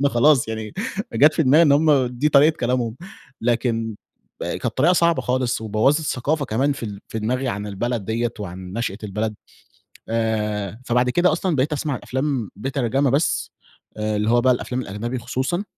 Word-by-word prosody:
أنا 140 Hz, -, +3 dB
خلاص 130 Hz, 0 st, +4 dB
يعني 110 Hz, -1 st, -5 dB, 0.4 s
جات 145 Hz, +7 st, +5 dB
في 160 Hz, -, +2 dB
دماغي 150 Hz, +5 st, +5 dB
إن 145 Hz, -, +5 dB
هم 145 Hz, -3 st, +4 dB
دي 125 Hz, +5 st, 0 dB
طريقة 150 Hz, +2 st, +5 dB
كلامهم، 120 Hz, -1 st, -1 dB, 0.4 s
لكن 115 Hz, -1 st, 0 dB, 0.5 s
كانت -, -, -3 dB
طريقة 160 Hz, +7 st, +3 dB
صعبة 170 Hz, -2 st, +2 dB
خالص 125 Hz, -1 st, 0 dB
وبوَّظت 110 Hz, +8 st, +2 dB
ثقافة 145 Hz, +2 st, -1 dB
كمان 135 Hz, +4 st, +1 dB
في 135 Hz, -, -9 dB
ال 100 Hz, -3 st, -5 dB
في 110 Hz, -, -4 dB
دماغي 125 Hz, +4 st, -1 dB
عن 105 Hz, -2 st, -3 dB
البلد 110 Hz, +2 st, -2 dB
دِيَّة 115 Hz, +3 st, -1 dB
وعن 95 Hz, -2 st, -7 dB
نشأة 110 Hz, -2 st, -3 dB
البلد. 105 Hz, +2 st, -2 dB, 0.7 s
آآ 110 Hz, -1 st, -1 dB
فبعد 125 Hz, +1 st, +2 dB
كده 175 Hz, +5 st, +3 dB
أصلًا 170 Hz, -1 st, 0 dB
بقيت 135 Hz, +4 st, +1 dB
أسمع 145 Hz, -2 st, -1 dB
الأفلام 130 Hz, -5 st, -2 dB
بترجمة 135 Hz, +3 st, 0 dB
بس، 140 Hz, +6 st, 0 dB, 0.5 s
آآ 105 Hz, 0 st, -1 dB
اللي 105 Hz, +2 st, 0 dB
هو 120 Hz, -, +4 dB
بقى 130 Hz, +1 st, +4 dB
الأفلام 125 Hz, +1 st, -3 dB
الأجنبي 120 Hz, +5 st, -4 dB
خصوصًا. 130 Hz, -, -2 dB
125 Hz, 170 wpm, -22 LUFS, 110-140 Hz, 0.7 s, جات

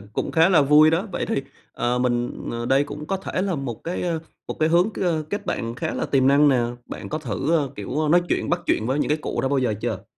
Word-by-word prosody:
cũng -, -, -3 dB
khá 165 Hz, +1 st, +5 dB
là 180 Hz, -6 st, +5 dB
vui 150 Hz, +2 st, +6 dB
đó. 175 Hz, +7 st, 0 dB
Vậy -, -, -2 dB
thì, 135 Hz, -, -1 dB, 0.3 s
ờ, 120 Hz, +1 st, -1 dB
mình 120 Hz, -1 st, -1 dB
ờ, 120 Hz, 0 st, -4 dB
đây 135 Hz, +3 st, +3 dB
cũng 150 Hz, +1 st, -8 dB
có 195 Hz, -, -1 dB
thể 185 Hz, -1 st, -3 dB
là 195 Hz, -2 st, -1 dB
một 125 Hz, -6 st, -5 dB
cái, 175 Hz, +2 st, -3 dB
ờ, 170 Hz, -2 st, -1 dB, 0.3 s
một -, -, -4 dB
cái 155 Hz, -, +3 dB
hướng 175 Hz, +5 st, +3 dB
k -, -, -16 dB, 0.3 s
kết 205 Hz, -, -4 dB
bạn 115 Hz, 0 st, -2 dB
khá 160 Hz, +5 st, -3 dB
là -, -, -2 dB
tiềm 135 Hz, -2 st, +2 dB
năng 145 Hz, +1 st, +5 dB
nè. 135 Hz, -, +4 dB, 0.3 s
Bạn -, -, -7 dB
có 155 Hz, -, -3 dB
thử, 155 Hz, +1 st, -1 dB
ờ, 140 Hz, -4 st, -1 dB
kiểu, 140 Hz, +10 st, -2 dB
nói 175 Hz, +3 st, +5 dB
chuyện, -, -, -1 dB
bắt 175 Hz, +1 st, +1 dB
chuyện 110 Hz, -, +1 dB
với 130 Hz, +4 st, 0 dB
những -, -, 0 dB
cái 150 Hz, -, +1 dB
cụ -, -, -3 dB
đó 135 Hz, -, 0 dB
bao 140 Hz, 0 st, +1 dB
giờ 125 Hz, -5 st, +1 dB
chưa? -, -, -3 dB
150 Hz, 270 wpm, -23 LUFS, 130-165 Hz, 0.3 s, vui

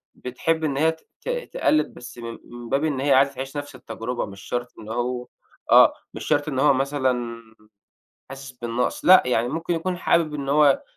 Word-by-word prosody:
بتحب 160 Hz, +6 st, -2 dB
إن 140 Hz, -3 st, -1 dB
هي 160 Hz, +3 st, +3 dB
ت 160 Hz, 0 st, -16 dB
ت -, -, -6 dB, 0.2 s
تقلد، 155 Hz, -, +1 dB
بس 125 Hz, -, -11 dB
من 115 Hz, -1 st, -7 dB
من 120 Hz, -1 st, -10 dB
باب 135 Hz, +2 st, +1 dB
إن 150 Hz, -4 st, 0 dB
هي 140 Hz, +1 st, +3 dB
عايزة 135 Hz, +1 st, +4 dB
تعيش 135 Hz, +2 st, -6 dB
نفس 145 Hz, -1 st, -6 dB
التجربة، 120 Hz, 0 st, -5 dB
مش 100 Hz, -1 st, -11 dB
شرط 120 Hz, +2 st, -4 dB
إن 110 Hz, -, -10 dB
هو 125 Hz, +2 st, -2 dB, 0.4 s
آه، -, -, +8 dB, 0.2 s
مش -, -, -7 dB
شرط 145 Hz, +1 st, +1 dB
إن 135 Hz, -4 st, -2 dB
هو 145 Hz, +1 st, +5 dB
مثلًا 130 Hz, -4 st, -1 dB, 0.9 s
حاسس 135 Hz, 0 st, -9 dB
بالنقص، 120 Hz, -1 st, -3 dB
لأ، 185 Hz, +1 st, +8 dB
يعني 120 Hz, -2 st, +1 dB
ممكن 165 Hz, +6 st, -2 dB
يكون 180 Hz, +2 st, -2 dB
حابب 165 Hz, -3 st, +1 dB
إن 140 Hz, -2 st, -4 dB
هو 145 Hz, -1 st, +4 dB
135 Hz, 190 wpm, -23 LUFS, 120-150 Hz, 0.9 s, آه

